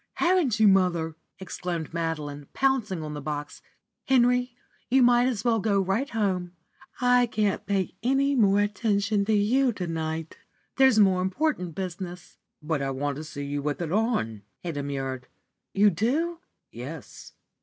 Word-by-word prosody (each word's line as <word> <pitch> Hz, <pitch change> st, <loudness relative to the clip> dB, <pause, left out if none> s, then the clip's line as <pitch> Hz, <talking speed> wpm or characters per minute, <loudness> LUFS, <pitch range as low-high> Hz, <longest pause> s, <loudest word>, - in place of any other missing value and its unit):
Haven't 345 Hz, -, +2 dB
you, 215 Hz, -, +6 dB
mother?" 175 Hz, -5 st, +2 dB, 0.2 s
exclaimed 175 Hz, -3 st, -5 dB
Madeline, 150 Hz, -4 st, -3 dB
pouncing 240 Hz, -11 st, 0 dB
on 150 Hz, -1 st, -5 dB
the 145 Hz, -, -6 dB
box. 145 Hz, 0 st, -5 dB, 0.5 s
"Henry, 250 Hz, -1 st, +3 dB, 0.3 s
you 260 Hz, 0 st, +5 dB
might 245 Hz, 0 st, +5 dB
as 230 Hz, -6 st, -2 dB
well 230 Hz, -2 st, +3 dB
go 200 Hz, -1 st, +1 dB
right 195 Hz, +9 st, 0 dB
home. 185 Hz, -6 st, -1 dB, 0.5 s
I 245 Hz, 0 st, +4 dB
can't 210 Hz, -2 st, -1 dB
pay 195 Hz, -3 st, 0 dB
any 270 Hz, +4 st, +2 dB
more 205 Hz, -5 st, +4 dB
attention 205 Hz, -1 st, 0 dB
to 220 Hz, -, +1 dB
you 240 Hz, +6 st, +3 dB
to 185 Hz, -, -4 dB
night. 160 Hz, -1 st, -4 dB, 0.4 s
There's 265 Hz, -4 st, +5 dB
more 190 Hz, -3 st, +4 dB
important 190 Hz, -, -1 dB
business." 180 Hz, -1 st, -6 dB, 0.2 s
"But 155 Hz, -2 st, -1 dB
I 135 Hz, -, -1 dB
want 140 Hz, +1 st, -2 dB
to 155 Hz, -, -6 dB
see 145 Hz, -2 st, -6 dB
you 145 Hz, 0 st, -3 dB
with 150 Hz, +1 st, -2 dB
it 170 Hz, -3 st, -3 dB
on," 195 Hz, -, 0 dB, 0.2 s
he 175 Hz, -, -3 dB
demurred. 135 Hz, -3 st, -4 dB, 0.4 s
"You 205 Hz, +1 st, +4 dB
do?" 300 Hz, -, 0 dB, 0.3 s
"Yes." -, -, -9 dB
195 Hz, 155 wpm, -26 LUFS, 160-240 Hz, 0.5 s, you